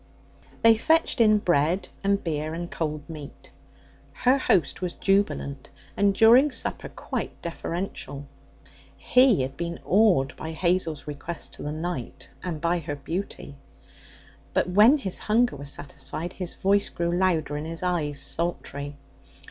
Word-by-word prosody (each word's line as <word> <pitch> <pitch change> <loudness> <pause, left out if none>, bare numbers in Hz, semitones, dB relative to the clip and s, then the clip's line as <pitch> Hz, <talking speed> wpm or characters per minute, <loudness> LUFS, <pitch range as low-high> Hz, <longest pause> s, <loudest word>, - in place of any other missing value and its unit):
They 225 -1 +7
fetched 320 0 +2
in 215 -1 +6
bread 175 0 +1
and 200 0 +1
beer 155 -1 -2
and 170 +1 -5
cold 155 -2 -3
meat. 155 -4 -10 0.6
Her 255 +2 +3
host 185 -9 +1
was 180 -1 -3
jubilant, 195 -9 0 0.3
and 200 -1 +2
during 240 +7 +7
supper, 260 - -2
quite - - -5
deferential. 170 -4 -5 0.7
He 250 - +4
had 135 +1 -5
been 170 +1 -4
awed 180 -9 +3
by 160 +1 -6
Hazel's 170 -3 0
request 150 +3 -6
to - - -11
the 150 - -3
night 155 -4 -5
and 170 -4 -4
by 170 +2 +1
her 145 -2 -5
beauty. 165 +1 -5 1.0
But - - +2
when 215 +10 +7
his 195 -10 -3
hunger 235 0 +2
was 140 0 -5
satisfied, 160 +4 -5
his 180 -2 -5
voice 200 +1 +2
grew 170 0 -1
louder 170 -5 +1
and 150 +2 -4
his 165 +2 -6
eyes 155 -5 -1
sultry. 145 -4 -3
170 Hz, 140 wpm, -26 LUFS, 150-200 Hz, 1.0 s, They